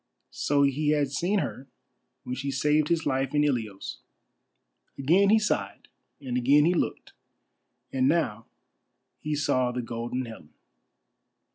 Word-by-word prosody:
So 140 0 +1
he 145 +2 +1
had 145 -2 0
seen 175 +9 0
her 135 -7 -3 0.6
when 125 - -5
she 140 +2 -3
saved 150 +3 +2
his 165 0 0
life 135 0 -1
in 145 - +4
Ilios. 115 -9 -2 1.0
Again 175 +9 +3
he 220 - +6
sighed 215 -1 -2 0.3
and 130 -3 -5
again 140 +4 +4
he 175 - +3
looked, 175 - -2 0.8
and 130 -1 +2
now 125 -9 0 0.7
he 150 0 -2
saw 140 -4 +1
the 125 0 -3
Golden 120 +2 -4
Helen. 110 -10 -12
140 Hz, 135 wpm, -27 LUFS, 125-150 Hz, 1.0 s, he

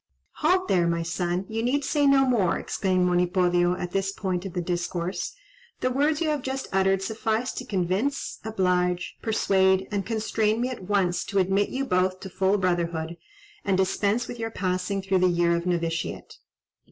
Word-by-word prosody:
"Halt 370 +4 +2
there, 175 -2 +3
my 170 0 0
son; 175 +2 -2
you 225 +1 -3
need 270 +4 0
say 290 -2 +2
no 275 -1 +5
more," 220 -9 +2
exclaimed 185 -2 0
Monipodio 175 0 +2
at 180 -1 -5
this 195 0 0
point 190 -2 -3
of 185 - -9
the - - -2
discourse. 175 - -3 0.5
"The 255 - +1
words 290 +4 +1
you 320 - +1
have 300 -2 0
just 265 +1 -4
uttered 195 0 +2
suffice 220 +4 -1
to 255 - -6
convince, 200 +7 -1
oblige, 180 -4 0
persuade, 190 -3 +2
and 200 -1 -1
constrain 220 0 0
me 250 +1 0
at 240 -7 -7
once 185 -3 +1
to 200 - -3
admit 195 +2 +2
you 270 +1 -2
both 185 -2 +1
to 190 - -8
full 190 +2 +2
brotherhood, 170 -3 -1 0.5
and 195 -2 +1
dispense 200 +5 +1
with 240 - -7
your 225 0 -2
passing 185 -1 -2
through 190 -1 +2
the 185 - +4
year 170 -1 +2
of 170 +1 -3
novitiate." 170 -1 -2
190 Hz, 175 wpm, -26 LUFS, 180-225 Hz, 0.5 s, no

